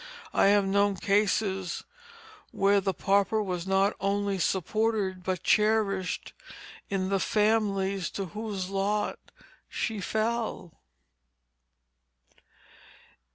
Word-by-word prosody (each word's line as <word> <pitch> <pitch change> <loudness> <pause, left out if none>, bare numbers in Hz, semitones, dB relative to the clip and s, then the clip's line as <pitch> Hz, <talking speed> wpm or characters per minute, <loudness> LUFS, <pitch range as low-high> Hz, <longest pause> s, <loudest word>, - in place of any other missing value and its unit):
I - - +4
have 200 0 +4
known 200 +1 +2
cases 195 -2 0 0.7
where 200 0 +2
the 195 0 0
pauper 200 +4 +1
was 180 -2 -4
not 195 +1 +2
only 200 0 0
supported 195 +1 0
but 185 -1 -2
cherished 210 -3 +1 0.6
in 190 -2 -1
the 195 0 +1
families 200 -3 +1
to 195 - -2
whose 205 -3 -4
lot 200 +2 -1 0.5
she 220 -3 -3
fell. 220 -3 -2
200 Hz, 95 wpm, -28 LUFS, 190-210 Hz, 0.7 s, I